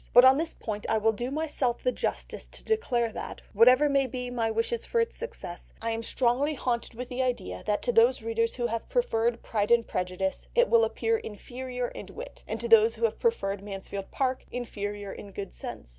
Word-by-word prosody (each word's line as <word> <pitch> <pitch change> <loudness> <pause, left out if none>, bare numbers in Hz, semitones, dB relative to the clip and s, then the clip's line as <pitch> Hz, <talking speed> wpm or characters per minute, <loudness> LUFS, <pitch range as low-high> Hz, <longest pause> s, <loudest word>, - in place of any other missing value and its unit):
But 245 +1 +9
on 260 +1 +8
this 325 +1 0
point 210 -1 -5
I 220 - +3
will 220 +1 +3
do 240 +4 -3
myself 285 -5 -1
the - - +3
justice - - -4
to - - -8
declare 245 - +1
that, - - -7
whatever 250 +7 +6
may 275 -2 +2
be 250 0 -4
my 230 -2 0
wishes 230 +1 -1
for 470 - 0
its 460 0 0
success, 175 - -7
I 230 0 -2
am 225 0 -2
strongly 255 +6 +1
haunted 240 -2 -2
with 250 +2 -5
the 255 0 -2
idea 90 - -2
that 210 0 +1
to 245 - +2
those 235 +1 +4
readers 230 0 0
who 240 - -1
have 230 -1 -3
preferred 235 - +1
Pride 210 -1 0
and 235 -1 +4
Prejudice 185 +1 -2
it 485 0 +5
will 465 0 +6
appear 455 0 0
inferior 250 - -5
in - - -9
wit, - - -9
and 220 - -3
to 235 - -3
those 225 0 +6
who 230 - -7
have 225 - -1
preferred 200 - 0
Mansfield 195 -1 -6
Park 260 -1 -1
inferior 205 -4 -4
in 200 -1 -10
good 195 -1 -6
sense." - - -7
235 Hz, 210 wpm, -28 LUFS, 220-260 Hz, -, But